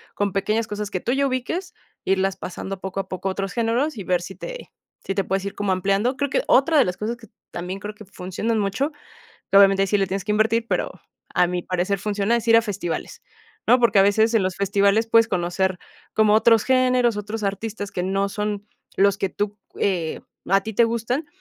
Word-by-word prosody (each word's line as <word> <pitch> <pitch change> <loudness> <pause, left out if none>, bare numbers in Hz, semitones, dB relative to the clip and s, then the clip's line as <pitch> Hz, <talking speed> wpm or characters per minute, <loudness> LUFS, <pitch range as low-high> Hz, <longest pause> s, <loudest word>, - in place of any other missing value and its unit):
con 205 -1 -1
pequeñas 215 +3 0
cosas 210 -1 -4
que 185 - -1
tú 235 - -2
ya 275 +1 +2
ubiques, 330 +9 -3 0.3
irlas 195 0 +1
pasando 190 +2 -6
poco 190 0 -4
a 195 - -3
poco 185 +1 -3
a - - 0
otros 195 -1 -4
géneros 235 +6 0
y - - -5
ver 180 -1 +1
si 190 - -7
te - - -8 0.3
si 195 - -2
te 195 - +1
puedes 195 0 -1
ir 200 - -4
como 205 -1 -1
ampliando. 195 +7 +1
Creo 285 0 -1
que - - 0
otra 305 +4 +4
de 275 - +6
las 180 - -2
cosas 230 +3 -3
que 225 -1 -15 0.2
también 180 +3 -5
creo 210 +2 -6
que 215 - -12
funcionan 190 +4 -3
mucho, 205 +9 -1 0.6
que, - - +4
obviamente, 195 -1 +6
ahí - - +2
sí 205 - +2
le 195 - +1
tienes 195 +1 -2
que 210 - -4
invertir, 225 +2 +2
pero - - 0 0.4
a 180 - +4
mi 180 0 -2
parecer 185 +2 -1
funciona, 205 +2 0
es 235 -1 -3
ir 230 - +7
a 230 - +5
festivales, 195 -6 -4 0.5
¿no?, 250 - +5
porque 235 -4 +4
a - - +7
veces 220 +3 +3
en 220 - +4
los 185 -1 -1
festivales 200 +2 +2
puedes 230 0 +5
conocer 180 0 0 0.4
como 215 -1 +4
otros 225 0 +5
géneros, 255 -3 +3
otros 210 +2 -5
artistas 205 +1 -3
que 180 - -2
no 195 +1 0
son 210 0 -3 0.3
los 200 0 +3
que 195 - 0
tú, 205 0 -3 0.2
eh, 175 -5 0 0.3
a 195 +2 +4
ti 220 - -5
te 235 - +5
gustan, 235 +6 -1
205 Hz, 220 wpm, -23 LUFS, 195-230 Hz, 0.6 s, ir